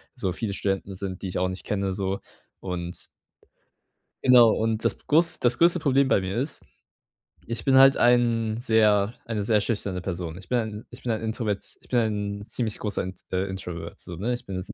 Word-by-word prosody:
so, 95 - -2
viele 105 +1 -3
Studenten 95 0 -2
sind, 95 -1 -5
die 95 - -4
ich - - -3
auch 90 - +1
nicht 95 0 -6
kenne 100 -2 -1
so 95 0 -2 0.4
und 90 -2 -5 1.2
genau, 125 -3 +7
und 110 0 0
das - - +1
groß 165 +3 +3
das 120 0 +2
größte 170 +1 +4
Problem 140 -3 +3
bei - - +4
mir 95 +2 -3
ist, 135 +5 -3 0.8
ich 115 -3 -4
bin 135 -1 +5
halt 135 +1 +8
ein 115 -2 +3
sehr 110 -3 +3
eine 110 -3 -2
sehr 105 0 +3
schüchterne 100 -4 -2
Person. 85 -3 -4
Ich 95 0 -12
bin 125 - +2
ein 110 -1 -4
ich 125 - -12
bin 120 - -1
ein 110 - -3
introvert 110 -2 -2 0.2
ich - - -20
bin 125 - +2 0.4
ein 100 - -9
ziemlich 110 -1 -3
großer 105 -3 -2
Int 95 0 -8
äh, 95 +1 +1
Introvert 85 -3 -7
so, 85 - -8
ne? 115 +8 -1
Ich 120 - -7
bin 95 -2 -4
105 Hz, 200 wpm, -25 LUFS, 95-120 Hz, 1.2 s, halt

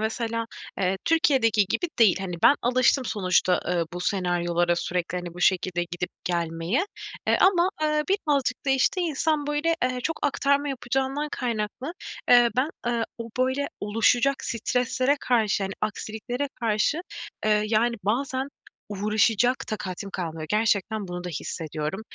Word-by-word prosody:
mesela, 230 +1 -2 0.3
eee, 190 0 0
Türkiye'deki 255 -10 +3
gibi 350 - -1
değil, 210 -5 +5
hani, 185 -2 -4
ben - - +7
alıştım 255 +2 +3
sonuçta, 185 -4 +2
eee, 175 -1 +1
bu 175 - -5
senaryolara 175 -2 +1
sürekli 175 0 -2
hani 175 -1 -7
bu 175 - -9
şekilde 180 -1 +2
gidip 175 +1 -4
gelmeye, 170 - 0 0.4
eee, - - +3
ama, 365 -2 +5
ııı, 305 0 +2
birazcık 290 -10 0
da, 270 - +3
işte, 270 +7 +2
insan 310 -2 0
böyle, 300 +3 +1
eee, 255 0 -1
çok 325 - -1
aktarma 280 0 +1
yapacağından 270 +3 -1
kaynaklı, 240 +4 -3 0.4
eee, 240 -1 +7
ben, 275 +5 +2 0.2
ııı, 235 -1 +1
o 230 0 -6
böyle 260 +2 +1
oluşacak 235 +6 +2
streslere 250 +4 0
karşı 220 -5 +1
yani 195 0 -2
aksiliklere 220 +5 -3
karşı, 225 +8 +1 0.5
ııı, 210 0 +3
yani, 230 +2 +2
bazen 260 +5 -1 0.4
uğraşacak 215 +4 +2
takatim 200 -2 -5
kalmıyor. 160 -4 -4
Gerçekten 210 -1 +1
bunu 175 0 -5
da - - -3
hissediyorum. 155 +1 -4
225 Hz, 140 wpm, -25 LUFS, 185-265 Hz, 0.5 s, ben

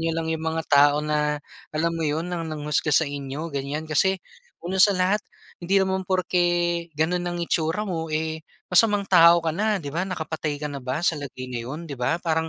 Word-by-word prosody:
niyo 165 0 0
lang 165 -1 -2
'yong 160 - -3
mga 160 0 -2
tao 145 +1 +6
na 150 -1 0 0.3
alam 165 +2 0
mo 165 - -3
'yon 155 +2 -1
nang 170 -2 -4
nanghusga 150 0 -1
sa 160 - +5
inyo, 140 +3 -5
ganyan. 140 +3 -3
Kasi, 190 +5 +2 0.5
una 185 +2 -1
sa 200 -1 +6
lahat, 190 +3 +2 0.4
hindi 185 +3 +1
naman 190 -1 +1
porke 185 -1 +1 0.6
gano'n 175 +3 0
ang 175 - -3
itsura 165 +6 0
mo, 165 -4 -3
eh, 160 +1 -2 0.3
masamang 205 +1 +4
tao 170 -2 +6
ka 160 - +1
na, 210 +4 +1
'di 145 -6 -6
ba? 170 - -1
Nakapatay 160 -4 -3
ka 150 0 -4
na 140 - -5
ba 130 +6 -3
sa - - +4
lagay 130 -2 -7
na 120 - -3
'yon, 150 +8 -6
'di 150 - -7
ba? 125 +7 0
Parang, 160 0 0
160 Hz, 205 wpm, -24 LUFS, 150-180 Hz, 0.6 s, tao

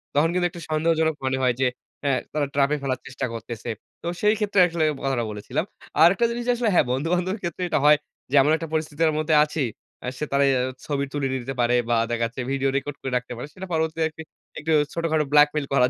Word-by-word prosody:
তখন 155 +3 +4
কিন্তু 180 0 +2
একটু 170 - -10
সন্দেহজনক 160 0 +2
মনে 130 0 +1
হয় 125 -1 +3
যে, 135 - +3 0.4
আ - - +3 0.2
তারা 150 -1 0
trap 140 0 +3
এ - - -3
ফেলার 130 -2 -1
চেষ্টা 130 - -3
করতেছে। 115 +1 -6 0.3
তো 170 - -6
সেই 210 0 +4
ক্ষেত্রে 205 -2 +1
আসলে 165 -1 -1 0.2
কথাটা 135 -3 0
বলেছিলাম। 105 -1 -3 0.4
আরেকটা 195 +8 +6
জিনিস 240 0 -4
আসলে 235 -2 +1
হ্যাঁ, 170 - +4
বন্ধু-বান্ধবের 175 - 0
ক্ষেত্রে 175 +1 -3
এটা - - +2
হয় 150 0 +7 0.3
যে, - - +1
এমন 150 +3 +3
একটা 165 - -5
পরিস্থিতির 155 0 +1
মধ্যে 155 0 +2
আছি, 150 0 -3 0.4
আ - - -3
সে 150 - -2
তারা 140 0 +3 0.4
ছবি 140 -2 -1
তুলে 140 -2 0
নিতে 130 +1 -4
পারে 120 +1 +3
বা 120 - +3
দেখা 115 0 -1
যাচ্ছে 125 +3 -5
ভিডিও 135 0 +1
record 145 0 -4
করে 135 - -4
রাখতে 125 0 -6
পারে। 125 - -6
সেটা 190 0 -8
পরবর্তী 160 0 -1 0.6
একটু 160 +2 -2 0.2
ছোটখাটো 160 -2 0
blackmail 150 0 +5
করার 125 -2 +4
150 Hz, 210 wpm, -24 LUFS, 135-165 Hz, 0.6 s, হয়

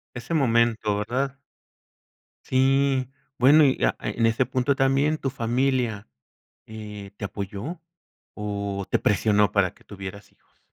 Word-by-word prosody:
Ese 120 +6 -6
momento, 115 -7 +2
¿verdad? 130 +6 -2 1.1
Sí, 135 0 +2 0.3
bueno, 145 +5 +7
y 135 - +2
a - - +2
en 115 - 0
ese 115 +3 +2
punto 130 +2 0
también, 135 +3 +2
tu 135 -3 -3
familia, 120 -3 -1 0.6
eh, 105 -2 -9
¿te - - -6
apoyó, 100 - -5 0.5
o, 100 -1 -3
te - - +2
presionó 105 0 +2
para 100 -3 +1
que - - -23
tuvieras 100 0 -9
hijos? - - -37
115 Hz, 130 wpm, -25 LUFS, 105-135 Hz, 1.1 s, bueno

